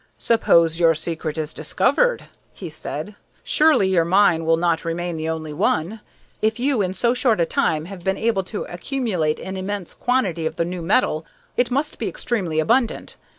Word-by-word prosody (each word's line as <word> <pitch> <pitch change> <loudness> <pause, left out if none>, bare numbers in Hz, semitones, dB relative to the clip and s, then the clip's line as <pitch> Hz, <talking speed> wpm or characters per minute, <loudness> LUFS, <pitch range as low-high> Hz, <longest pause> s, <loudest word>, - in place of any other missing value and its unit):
"Suppose 170 -8 +3
your 165 -1 +4
secret 160 0 -4
is 155 -1 -3
discovered," - - +1 0.3
he - - -8
said. - - -6 0.3
"Surely 305 -10 +4
your 180 -3 +3
mine 175 -2 +3
will 165 0 +3
not 170 -1 +1
remain 170 +1 -3
the 160 0 -3
only 155 -2 -4
one. 185 +4 0 0.4
If 220 +2 +1
you, 260 -3 +1
in 185 -1 -2
so 235 +3 +2
short 245 -5 +2
a 170 - +3
time, 155 -1 0
have 185 -1 -9
been 190 +1 0
able 225 -4 +1
to 205 - -4
accumulate 180 - -2
an 190 0 -6
immense 190 -1 -4
quantity 195 -11 0
of - - -6
the 170 - 0
new 180 0 -5
metal, 165 -3 +1 0.3
it 245 -1 +1
must 280 +4 -2
be - - -2
extremely 195 - -2
abundant. 235 +8 0
180 Hz, 180 wpm, -22 LUFS, 165-230 Hz, 0.4 s, your